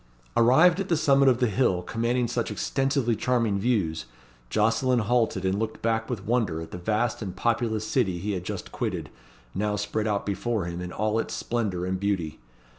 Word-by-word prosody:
Arrived 160 +10 +5
at 195 - -3
the 165 - +3
summit 140 -2 +4
of 125 - +3
the 125 - +2
hill, 100 -6 +1
commanding 120 +3 0
such 120 0 -2
extensively 135 +2 0
charming 115 -4 +1
views, 95 -9 0 0.4
Jocelyn 115 - +2
halted 115 -4 +1
and 95 +2 +1
looked 110 0 -4
back 110 -1 0
with 105 -6 -4
wonder 110 -9 0
at 80 - -8
the 90 - -6
vast 110 +6 0
and 95 -4 -5
populous 115 -2 0
city 110 -7 +1
he 100 +5 -3
had 90 -3 -3
just - - -6
quitted, - - -3 0.4
now 105 +1 0
spread 105 +1 -2
out 105 -2 -1
before 105 0 -1
him 85 0 -5
in 90 0 -5
all 110 +3 0
its - - -3
splendour 105 -7 -2
and 95 0 -2
beauty. 95 -6 -2
110 Hz, 190 wpm, -26 LUFS, 95-120 Hz, 0.4 s, Arrived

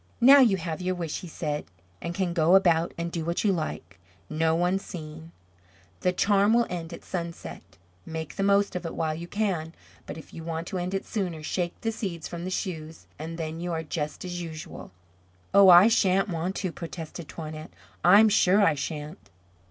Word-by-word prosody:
"Now 270 +4 +8
you 225 -8 +5
have 165 -1 -4
your 185 0 -1
wish," 170 -3 -4
he 180 - -9
said, 150 -2 -3 0.4
"and 170 - -4
can 185 -2 -1
go 170 +2 +4
about 170 -3 +4
and 170 0 -3
do 165 -2 -3
what 170 +2 -1
you 205 -3 +3
like, 95 - -5 0.3
no 160 +1 +2
one 180 +3 +1
seeing. 160 -3 -9 0.7
The 180 - +2
charm 205 +3 +3
will 235 0 +4
end 170 -2 -5
at 170 - -9
sunset. 170 -2 -5 0.4
Make 160 - -6
the - - -3
most 200 0 +3
of 180 - -3
it 165 - -5
while 160 -1 -1
you 170 +2 -7
can; 180 -6 -2 0.3
but - - -6
if 160 - -12
you 165 - -8
want 165 0 -4
to 185 - -3
end 180 +2 -2
it 195 - -3
sooner, 180 -7 -3
shake 175 +2 -2
the 225 - -1
seeds 190 -7 -5
from 170 0 -6
the - - -3
shoes 165 -4 -5
and 165 +2 -6
then 160 0 -4
you 175 0 -3
are 160 0 -2
just 150 +1 -4
as 175 -1 -4
usual." 160 -2 -8 0.6
"Oh, 200 -1 +8
I 180 +3 +9
shan't 195 -3 +3
want 175 +2 -2
to," 185 - -2
protested 165 0 -7
Toinette; 155 -1 -7 0.3
"I'm 200 +5 +7
sure 200 -1 +4
I 200 - +4
shan't." 150 +3 -6
170 Hz, 200 wpm, -27 LUFS, 160-190 Hz, 0.7 s, I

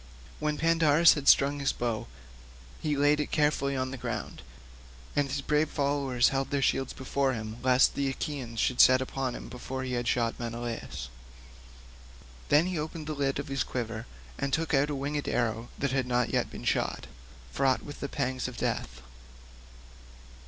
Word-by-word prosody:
When 150 -1 -1
Pandarus 165 0 +5
had 145 -2 -5
strung 140 +1 +5
his 140 -1 +1
bow 115 -3 -3 0.7
he 150 -2 0
laid 145 +1 +4
it 150 - -1
carefully 145 -2 +1
on 130 0 -2
the 130 - -6
ground, - - -4 0.7
and 145 -1 +2
his 140 +1 -3
brave 150 +1 +2
followers 140 -4 +1
held 135 -1 -1
their 140 - 0
shields 135 0 +1
before 135 0 -1
him 110 -1 -5
lest 130 +1 +4
the 140 -1 0
Achaeans 135 -5 -4
should 125 - +3
set 130 0 +7
upon 130 -1 -3
him - - -8
before 130 +1 -5
he 130 -1 -3
had 120 -1 -1
shot 115 -1 0
Menelaus. 115 - -5 1.4
Then 150 +3 +5
he 180 -3 -2
opened 155 +1 -5
the 155 - -3
lid 140 -2 0
of - - -4
his 135 -1 -1
quiver 115 -2 -4 0.3
and 140 - -1
took 160 +2 0
out 140 +1 +3
a 145 - -2
winged 145 +2 -3
arrow 115 -1 -1
that 140 -1 -1
had 135 -2 0
not 125 -1 +1
yet - - +1
been - - -9
shot, - - 0 0.5
fraught 130 - +1
with 145 - -9
the 140 - -4
pangs 130 -2 -2
of 125 - -8
death. 60 +2 -3
135 Hz, 175 wpm, -29 LUFS, 125-145 Hz, 1.4 s, set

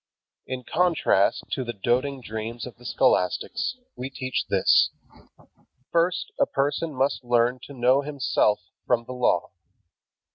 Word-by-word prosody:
In 130 -1 -4
contrast 165 - +2
to 130 - -1
the 120 -1 -4
doting 125 +6 0
dreams 110 +1 -5
of 125 - -10
the 120 - -17
scholastics, 135 - +1 0.2
we 130 +1 -5
teach 130 -1 -3
this: - - +4 1.0
First 170 +1 +1
a - - +4
person 145 +4 -1
must 135 +1 0
learn 120 +1 +2
to 140 - -11
know 130 +2 +3
himself 140 -7 +1 0.3
from 120 -1 +2
the 130 - -7
Law. 125 -1 +1
130 Hz, 135 wpm, -25 LUFS, 120-140 Hz, 1.0 s, this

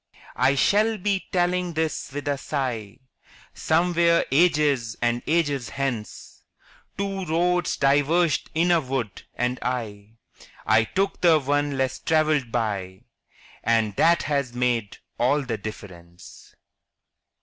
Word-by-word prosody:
I 130 +2 +4
shall 215 +9 +2
be 195 0 -1
telling 180 -1 0
this 160 -3 -2
with 145 +1 -6
a 145 - +1
sigh 125 -8 -4 0.6
Somewhere 170 +1 +2
ages 145 -7 +2
and 120 0 0
ages 145 -6 0
hence: 130 -6 -5 0.6
Two 195 -1 -3
roads 175 +2 0
diverged 145 +4 +2
in 170 +2 +2
a 170 -2 +4
wood, 130 -8 -4
and 125 +1 -1
I–– 110 -4 -4 0.5
I 110 +1 +4
took 195 - -2
the 165 -3 +5
one 145 0 -1
less 130 -1 -1
traveled 155 -6 +1
by, 100 -5 -3 0.6
And 110 -3 +1
that 170 +1 +4
has 140 -5 -2
made 120 -4 -1 0.2
all 140 +5 +2
the 115 -4 -4
difference. 90 -5 -11
140 Hz, 120 wpm, -24 LUFS, 120-170 Hz, 0.6 s, the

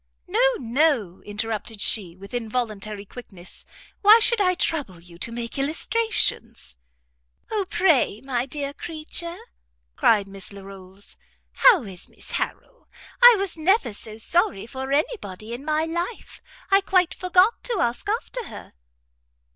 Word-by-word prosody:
"No, - - +3
no," 245 - 0
interrupted 215 +1 -4
she, 190 -5 +2
with 195 +3 -13
involuntary 215 -3 -4
quickness, 190 -6 -12 0.4
"why 430 +2 +8
should 460 -1 +4
I 365 -2 +2
trouble 285 - 0
you 170 0 -16
to 230 - 0
make 235 +2 -5
illustrations?" 280 - 0 0.8
"O 405 -3 -1
pray, 320 - +2
my 255 -1 -2
dear 280 0 -3
creature," 335 +2 -5 0.6
cried 210 -4 +3
Miss 195 0 -8
Larolles, 195 0 -13 0.4
"how 410 - +5
is 190 -4 -9
Mrs - - -12
Harrel? - - -5 0.3
I 485 -1 +10
was 395 -2 -3
never 335 - +2
so 215 +1 -9
sorry 225 - 0
for 265 +2 -6
any 305 - +1
body 215 - -9
in 245 +3 -7
my 310 +1 0
life. 345 +7 -5 0.3
I 390 +1 +6
quite 370 -3 +2
forgot 365 +4 +2
to 475 -4 -1
ask 240 +9 -1
after 465 +2 -3
her." - - -11
265 Hz, 140 wpm, -23 LUFS, -, 0.8 s, I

